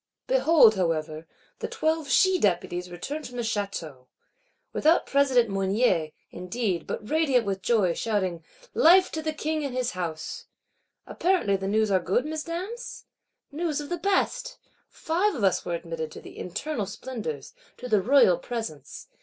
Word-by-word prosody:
Behold, 330 Hz, -, +5 dB
however, 160 Hz, -2 st, -2 dB, 0.3 s
the -, -, -3 dB
Twelve 315 Hz, -2 st, -1 dB
She 375 Hz, +7 st, +4 dB
deputies 180 Hz, -, 0 dB
return 225 Hz, -, -5 dB
from 245 Hz, -4 st, -9 dB
the 240 Hz, -, -1 dB
Château. 195 Hz, -, -4 dB, 0.7 s
Without 320 Hz, +3 st, +3 dB
President 270 Hz, -4 st, +3 dB
Mounier, 195 Hz, -4 st, +1 dB, 0.2 s
indeed; 180 Hz, -1 st, -3 dB
but 210 Hz, -, -5 dB
radiant 275 Hz, -5 st, +2 dB
with 195 Hz, -1 st, -2 dB
joy, 200 Hz, -6 st, +2 dB
shouting 185 Hz, -5 st, -2 dB, 0.3 s
'Life 365 Hz, +3 st, +6 dB
to 315 Hz, -, -3 dB
the 315 Hz, 0 st, -2 dB
King 310 Hz, 0 st, -2 dB
and 270 Hz, -3 st, -4 dB
his 250 Hz, -1 st, 0 dB
House.' 170 Hz, -4 st, -5 dB, 0.6 s
Apparently 350 Hz, -, +1 dB
the 195 Hz, 0 st, -3 dB
news 215 Hz, +1 st, +1 dB
are 190 Hz, -, +4 dB
good, 190 Hz, +9 st, 0 dB
Mesdames? 345 Hz, +10 st, -5 dB, 0.5 s
News 310 Hz, 0 st, -2 dB
of 290 Hz, -, -6 dB
the 350 Hz, -, -2 dB
best! 480 Hz, +7 st, 0 dB, 0.3 s
Five 360 Hz, +5 st, 0 dB
of 235 Hz, -, -4 dB
us 190 Hz, -, +2 dB
were 175 Hz, -1 st, -1 dB
admitted 165 Hz, -2 st, -5 dB
to -, -, -9 dB
the -, -, -12 dB
internal 210 Hz, -, -4 dB
splendours, 200 Hz, -, -6 dB, 0.2 s
to 250 Hz, -, -7 dB
the 215 Hz, -4 st, +3 dB
Royal 205 Hz, -7 st, +5 dB
Presence. 165 Hz, -, -6 dB
230 Hz, 155 wpm, -26 LUFS, -, 0.7 s, Life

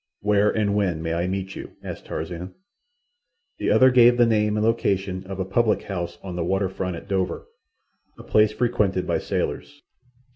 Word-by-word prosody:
"Where 105 Hz, 0 st, +3 dB
and 105 Hz, -2 st, 0 dB
when 90 Hz, -6 st, 0 dB
may 80 Hz, 0 st, -2 dB
I 85 Hz, +2 st, -1 dB
meet 95 Hz, +1 st, -4 dB
you?" -, -, -8 dB
asked -, -, -7 dB
Tarzan. 90 Hz, +2 st, -6 dB, 1.0 s
The -, -, 0 dB
other 130 Hz, 0 st, +6 dB
gave 120 Hz, -1 st, +6 dB
the 120 Hz, -, +5 dB
name 105 Hz, -2 st, +1 dB
and 105 Hz, -, +1 dB
location 95 Hz, -4 st, 0 dB
of 95 Hz, 0 st, -6 dB
a 95 Hz, -, -1 dB
public 110 Hz, +3 st, +1 dB
house 85 Hz, -3 st, -5 dB
on 95 Hz, -2 st, -6 dB
the 85 Hz, -, -1 dB
water 95 Hz, +2 st, 0 dB
front 90 Hz, -1 st, -4 dB
at -, -, -10 dB
Dover—a 95 Hz, -2 st, -6 dB
place 105 Hz, 0 st, +3 dB
frequented 105 Hz, -5 st, 0 dB
by -, -, 0 dB
sailors. 145 Hz, 0 st, -4 dB
100 Hz, 175 wpm, -24 LUFS, 90-105 Hz, 1.0 s, other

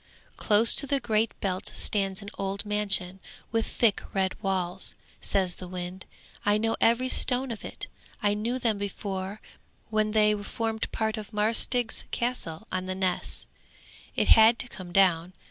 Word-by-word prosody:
'Close 215 Hz, +2 st, +5 dB
to 280 Hz, -, +3 dB
the 280 Hz, +1 st, +1 dB
Great 225 Hz, -2 st, 0 dB
Belt 185 Hz, -2 st, -2 dB
stands 195 Hz, -1 st, 0 dB
an 200 Hz, -, -8 dB
old 195 Hz, +1 st, -3 dB
mansion 200 Hz, -3 st, +1 dB, 0.3 s
with 225 Hz, -1 st, 0 dB
thick 225 Hz, -4 st, +2 dB
red 190 Hz, -1 st, +1 dB
walls,' 190 Hz, -1 st, -2 dB, 0.3 s
says 190 Hz, -3 st, +1 dB
the 180 Hz, -, -9 dB
wind. 180 Hz, +1 st, -7 dB, 0.4 s
'I 205 Hz, +1 st, +3 dB
know 225 Hz, +1 st, 0 dB
every 235 Hz, +3 st, +3 dB
stone 255 Hz, 0 st, +2 dB
of 225 Hz, -, -7 dB
it; -, -, -7 dB, 0.3 s
I 205 Hz, -1 st, +2 dB
knew 225 Hz, +4 st, -2 dB
them 225 Hz, -5 st, 0 dB
before 200 Hz, 0 st, -5 dB, 0.5 s
when 215 Hz, -1 st, +1 dB
they 210 Hz, -1 st, +5 dB
formed 220 Hz, +2 st, -3 dB
part 220 Hz, 0 st, -1 dB
of 215 Hz, 0 st, -8 dB
Marsk 215 Hz, +1 st, +2 dB
Stig's 245 Hz, -3 st, +1 dB
Castle 225 Hz, -6 st, -2 dB
on 185 Hz, 0 st, -3 dB
the 185 Hz, -, -3 dB
Ness. 185 Hz, -1 st, -1 dB, 0.7 s
It -, -, +1 dB
had 225 Hz, +1 st, +7 dB
to 250 Hz, -, 0 dB
come 185 Hz, -6 st, -10 dB
down. 180 Hz, -2 st, +3 dB
210 Hz, 165 wpm, -27 LUFS, 190-225 Hz, 0.7 s, had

